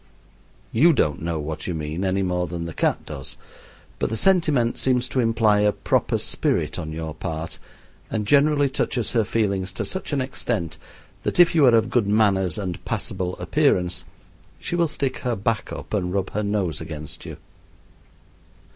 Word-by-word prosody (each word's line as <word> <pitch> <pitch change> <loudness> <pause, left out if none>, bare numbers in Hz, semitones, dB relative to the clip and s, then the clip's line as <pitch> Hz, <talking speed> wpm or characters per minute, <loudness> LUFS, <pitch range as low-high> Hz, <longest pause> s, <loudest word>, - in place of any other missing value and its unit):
You 160 +9 +5
don't 75 - +1
know 85 0 -2
what 75 0 -5
you 90 - -2
mean 80 +3 -3
any 95 +1 +1
more 90 -1 0
than 85 0 -4
the 85 - -6
cat - - 0
does, 70 -3 -7 0.6
but - - 0
the 110 - -2
sentiment 155 - +3
seems 125 -1 +2
to 130 - -1
imply 115 -3 +3
a 105 0 +4
proper - - 0
spirit - - -1
on 80 - -5
your 80 0 -4
part, 80 0 -5 0.5
and 105 -2 -2
generally 145 +3 +4
touches 130 -3 -1
her 115 -2 +3
feelings 100 -3 0
to - - -3
such 190 - -4
an 145 - +1
extent 105 - -3 0.4
that - - -2
if 175 - +7
you 155 -5 +5
are 120 - +6
of 110 - +2
good 115 -5 +2
manners 100 -4 +2
and 95 -4 -4
passable 90 -1 -2
appearance 90 0 +1 0.6
she - - -3
will 170 -1 +3
stick 140 -3 -2
her 125 -2 -1
back 105 +1 -1
up - - -7
and 90 -4 0
rub 95 -1 -1
her 105 - -1
nose 100 -7 -1
against 75 -2 -6
you. - - -7
100 Hz, 175 wpm, -23 LUFS, 85-120 Hz, 0.6 s, if